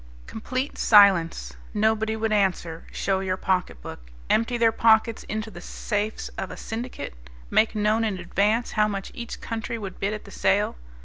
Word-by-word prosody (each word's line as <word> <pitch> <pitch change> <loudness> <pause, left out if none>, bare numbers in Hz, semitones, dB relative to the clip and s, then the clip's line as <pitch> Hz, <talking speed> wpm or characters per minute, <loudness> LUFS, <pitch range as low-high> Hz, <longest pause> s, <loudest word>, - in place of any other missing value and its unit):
Complete 255 +5 -4
silence. 170 - +5 0.2
Nobody 220 +1 +1
would 220 0 -1
answer, 180 -5 0
show 190 -1 0
your 185 -1 -1
pocketbook. 180 - -2 0.3
Empty 230 +2 +2
their 230 -1 +4
pockets 225 0 +3
into 215 +1 -4
the 175 - -10
safes 210 +3 -3
of - - -3
a - - -8
syndicate. 235 - -6 0.4
Make 220 - +3
known 215 +2 +2
in 210 -4 -1
advance 205 +6 0
how 210 -1 +3
much 195 -2 -4
each 235 -1 -7
country 230 +1 -4
would 195 -4 -7
bid 200 +2 -1
at 210 - -8
the 200 - -12
sale. 200 +2 +1
215 Hz, 165 wpm, -25 LUFS, 195-225 Hz, 0.4 s, silence